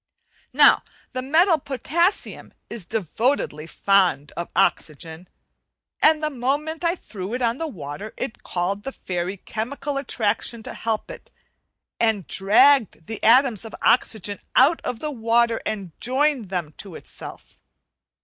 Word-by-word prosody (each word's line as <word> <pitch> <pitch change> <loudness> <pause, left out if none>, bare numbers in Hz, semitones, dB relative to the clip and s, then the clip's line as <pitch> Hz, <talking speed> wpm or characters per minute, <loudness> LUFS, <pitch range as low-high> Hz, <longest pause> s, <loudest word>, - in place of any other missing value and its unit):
Now - - +6 0.3
the 255 - -3
metal 320 +5 +4
potassium 315 - -1 0.2
is 215 -7 -3
devotedly 215 - -1
fond 185 -7 +2
of 170 - -4
oxygen, 160 +3 0 0.7
and 310 0 +5
the 305 - 0
moment 290 +6 -2
I 340 +1 +2
threw 210 - -6
it 250 - -2
on 235 +2 +1
the 325 - -2
water 195 - -7
it 245 -3 -5
called 185 +3 -2
the 270 - -5
fairy 180 -3 -4
"chemical 270 +8 -4
attraction' 230 -3 -1
to - - -7
help 225 -2 -3
it, - - -11 0.7
and 220 -5 +1
dragged 220 - +4
the 220 0 -6
atoms 240 -3 +5
of 225 - -8
oxygen 210 -4 +2 0.2
out 290 +6 +5
of 240 -2 -4
the 305 - -2
water 230 -2 +2
and 195 -5 -4
joined 260 -3 +1
them 175 -5 -3
to 190 -5 -7
itself. - - -9
230 Hz, 140 wpm, -23 LUFS, 195-275 Hz, 0.7 s, Now